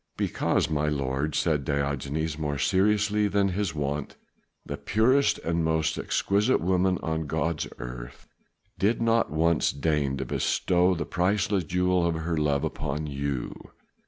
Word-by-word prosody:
"Because, -, -, 0 dB
my 75 Hz, -1 st, 0 dB
lord," 70 Hz, 0 st, -1 dB
said 75 Hz, -4 st, +1 dB
Diogenes 70 Hz, +2 st, -2 dB
more 75 Hz, -2 st, -3 dB
seriously 105 Hz, +5 st, +2 dB
than 100 Hz, 0 st, +2 dB
was 90 Hz, -, -4 dB
his 100 Hz, -5 st, -1 dB
wont, 70 Hz, -1 st, -3 dB, 0.5 s
"the -, -, -4 dB
purest 130 Hz, +7 st, +2 dB
and 85 Hz, 0 st, 0 dB
most 80 Hz, 0 st, +1 dB
exquisite 105 Hz, +6 st, +1 dB
woman 90 Hz, +1 st, +1 dB
on 80 Hz, -1 st, -2 dB
God's 80 Hz, +1 st, -1 dB
earth -, -, -8 dB, 0.5 s
did 105 Hz, +4 st, +2 dB
once 85 Hz, -8 st, +2 dB
deign 70 Hz, -2 st, 0 dB
to -, -, -3 dB
bestow 90 Hz, +1 st, +1 dB
the 80 Hz, -3 st, -3 dB
priceless 95 Hz, +2 st, 0 dB
jewel 90 Hz, +1 st, +1 dB
of 85 Hz, -, 0 dB
her 80 Hz, +1 st, -2 dB
love 75 Hz, -2 st, +1 dB
upon 75 Hz, 0 st, -3 dB
you. 70 Hz, -3 st, -3 dB
80 Hz, 140 wpm, -27 LUFS, 75-95 Hz, 0.5 s, seriously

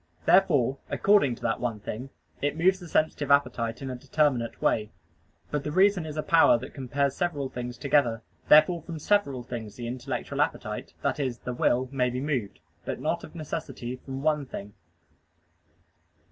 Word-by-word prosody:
Therefore, 145 Hz, -9 st, +4 dB
according 195 Hz, -12 st, +3 dB
to -, -, -16 dB
that -, -, 0 dB
one 115 Hz, -3 st, -2 dB
thing, 120 Hz, +6 st, -6 dB, 0.3 s
it 145 Hz, +2 st, -1 dB
moves 190 Hz, +3 st, +3 dB
the 175 Hz, -, -10 dB
sensitive 155 Hz, -2 st, 0 dB
appetite 125 Hz, -4 st, +1 dB
in 135 Hz, -, -4 dB
a -, -, -4 dB
determinate 130 Hz, -2 st, 0 dB
way. 105 Hz, -1 st, +1 dB, 0.6 s
But 150 Hz, -2 st, -1 dB
the 150 Hz, -, -3 dB
reason 190 Hz, -1 st, +3 dB
is 155 Hz, 0 st, -6 dB
a 155 Hz, -, -1 dB
power 160 Hz, -7 st, +5 dB
that 125 Hz, +3 st, -9 dB
compares 140 Hz, 0 st, -1 dB
several 150 Hz, -7 st, -1 dB
things 125 Hz, -1 st, -6 dB
together: 125 Hz, -5 st, +2 dB, 0.2 s
therefore 155 Hz, +3 st, +6 dB
from 165 Hz, 0 st, -7 dB
several 145 Hz, -8 st, +1 dB
things 115 Hz, -4 st, -7 dB
the 120 Hz, -, -6 dB
intellectual 125 Hz, +1 st, -3 dB
appetite -, -, -3 dB
that -, -, 0 dB
is, 130 Hz, -4 st, -1 dB
the 125 Hz, -, -5 dB
will 125 Hz, +1 st, +1 dB
may 125 Hz, -2 st, +1 dB
be 125 Hz, +1 st, -3 dB
moved; 130 Hz, -, -2 dB, 0.2 s
but -, -, -4 dB
not -, -, -1 dB
of -, -, -11 dB
necessity 150 Hz, -6 st, -5 dB
from 135 Hz, +1 st, -7 dB
one 150 Hz, -3 st, +1 dB
thing. 100 Hz, -4 st, -8 dB
135 Hz, 175 wpm, -27 LUFS, 120-155 Hz, 0.6 s, therefore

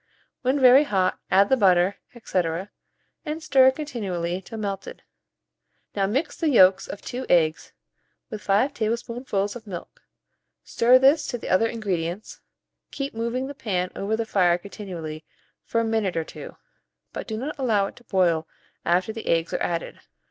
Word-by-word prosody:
When 260 Hz, +3 st, +1 dB
very 260 Hz, +3 st, +7 dB
hot, 190 Hz, -6 st, 0 dB
add 195 Hz, +2 st, +4 dB
the 265 Hz, -, +5 dB
butter, 190 Hz, -3 st, +3 dB, 0.3 s
&c., 185 Hz, -, +1 dB, 0.8 s
and 310 Hz, +1 st, -5 dB
stir 270 Hz, -4 st, +6 dB
continually 195 Hz, -, -3 dB
till 225 Hz, +4 st, -9 dB
melted. 200 Hz, -2 st, -5 dB, 0.9 s
Now 195 Hz, -1 st, +1 dB
mix 265 Hz, +11 st, -1 dB
the 325 Hz, -, 0 dB
yolks 190 Hz, -7 st, +5 dB
of 205 Hz, -, -8 dB
2 255 Hz, +1 st, -5 dB
eggs 160 Hz, -3 st, +2 dB, 0.6 s
with 210 Hz, -, -6 dB
5 215 Hz, +9 st, +2 dB
tablespoonfuls 225 Hz, -2 st, -2 dB
of 225 Hz, -2 st, -10 dB
milk; 180 Hz, -4 st, -8 dB, 0.6 s
stir 245 Hz, +2 st, +4 dB
this 275 Hz, +4 st, +4 dB
to 245 Hz, -, -3 dB
the -, -, -7 dB
other 205 Hz, +5 st, +3 dB
ingredients, 195 Hz, -4 st, -4 dB, 0.5 s
keep 275 Hz, 0 st, -5 dB
moving 235 Hz, +3 st, -2 dB
the 280 Hz, -, -6 dB
pan 185 Hz, -9 st, -2 dB
over 205 Hz, +3 st, -1 dB
the 230 Hz, -, -2 dB
fire 180 Hz, -5 st, +3 dB
continually 175 Hz, -5 st, -8 dB, 0.4 s
for 230 Hz, -, 0 dB
a -, -, -1 dB
minute 220 Hz, -6 st, 0 dB
or 165 Hz, -, 0 dB
two, -, -, -10 dB, 0.6 s
but -, -, -6 dB
do 220 Hz, -, -4 dB
not 275 Hz, +5 st, -5 dB
allow 220 Hz, -7 st, +2 dB
it -, -, -8 dB
to 240 Hz, -, -16 dB
boil 170 Hz, -6 st, +1 dB, 0.4 s
after 180 Hz, +5 st, +1 dB
the 225 Hz, -, -8 dB
eggs 165 Hz, 0 st, +1 dB
are -, -, -1 dB
added. 170 Hz, -1 st, -3 dB
210 Hz, 165 wpm, -24 LUFS, 185-245 Hz, 0.9 s, very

